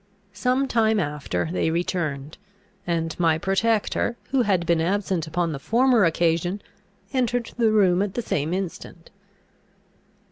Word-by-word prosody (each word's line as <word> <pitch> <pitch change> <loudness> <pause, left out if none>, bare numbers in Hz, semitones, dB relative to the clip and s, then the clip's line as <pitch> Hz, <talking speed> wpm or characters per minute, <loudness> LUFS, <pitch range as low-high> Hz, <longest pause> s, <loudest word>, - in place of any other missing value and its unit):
Some 250 +7 0
time 220 -3 +2
after 145 - -2
they 175 - 0
returned; 160 -4 -3 0.5
and 165 -2 -1
my 165 -2 +3
protector, 215 +5 0
who 270 -1 +3
had 190 -7 +1
been 165 -1 +2
absent 185 -2 -1
upon 170 +1 -1
the 140 - -5
former 235 - +3
occasion, 170 +3 +1 0.5
entered 245 -2 0
the 230 -2 +4
room 190 -4 +3
at 200 -1 -2
the 240 - -2
same 155 -5 -1
instant. 180 -2 -6
180 Hz, 135 wpm, -24 LUFS, 165-220 Hz, 0.5 s, the